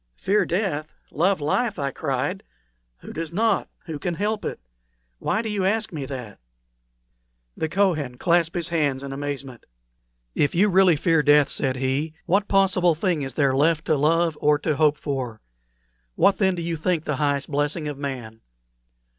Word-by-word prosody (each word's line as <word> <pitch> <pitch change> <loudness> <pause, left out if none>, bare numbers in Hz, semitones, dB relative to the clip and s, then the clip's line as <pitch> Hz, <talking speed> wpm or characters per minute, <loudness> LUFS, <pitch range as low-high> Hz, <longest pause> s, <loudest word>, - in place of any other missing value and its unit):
"Fear 200 - +1
death! 165 -5 -2 0.2
love 185 +4 +2
life!" 205 +9 0
I 140 -1 -2
cried. 140 +7 -2 0.6
"Who - - -9
does 165 0 -4
not? 215 +2 +1 0.2
Who 160 -4 -5
can 175 +3 -2
help 210 +3 -1
it? - - -4 0.6
Why 220 - 0
do 220 - -3
you 200 -2 -1
ask 215 +1 0
me 145 -4 -4
that?" 125 -7 -7 1.2
The 160 - -2
Kohen 155 -9 0
clasped 170 +1 +2
his 175 +1 -2
hands 145 -5 0
in 135 0 -5
amazement. 140 -3 -5 0.7
"If 145 - +1
you 200 +4 +4
really 185 -2 +5
fear 165 +1 +2
death," 145 -1 +5
said 130 -2 -1
he, 135 +5 -1
"what 200 +3 +2
possible 185 -3 +3
thing 170 -2 0
is 135 -1 -5
there 140 -3 +2
left 160 +3 +2
to 155 - +2
love 165 +3 +2
or 150 0 +4
to 155 +1 -1
hope 150 0 +3
for? 130 -6 -4 0.8
What, 200 - +3
then, 190 -3 +3
do 170 - -4
you 165 -1 -2
think 165 0 0
the 150 -4 -2
highest 145 -1 -1
blessing 145 +2 -1
of 145 -2 -5
man?" 120 -6 -6
155 Hz, 170 wpm, -24 LUFS, 140-180 Hz, 1.2 s, really